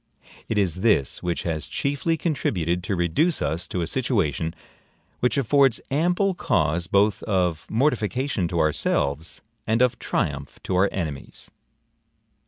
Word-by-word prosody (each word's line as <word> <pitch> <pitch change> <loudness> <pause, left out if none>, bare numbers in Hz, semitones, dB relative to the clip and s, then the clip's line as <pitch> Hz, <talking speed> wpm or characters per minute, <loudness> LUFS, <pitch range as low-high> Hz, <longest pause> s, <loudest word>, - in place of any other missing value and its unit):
It 110 - 0
is 95 -4 +1
this 100 - +2
which 85 -1 -2
has 80 -3 -2
chiefly 145 +4 -1
contributed 90 - -1
to 95 - -1
reduce 90 - +1
us 85 +2 -2
to 90 - -2
a - - -1
situation, 85 - -1 0.6
which 125 +3 +1
affords 135 -1 +3
ample 180 +7 +2
cause 85 - 0
both 100 +3 +2
of 90 -6 0
mortification 115 - 0
to 85 0 -2
ourselves, 75 0 0 0.2
and 110 +1 +2
of 125 -1 +2
triumph 70 -1 -2
to 95 - -2
our 95 +2 +4
enemies. 75 -7 -5
95 Hz, 135 wpm, -24 LUFS, 85-130 Hz, 0.6 s, our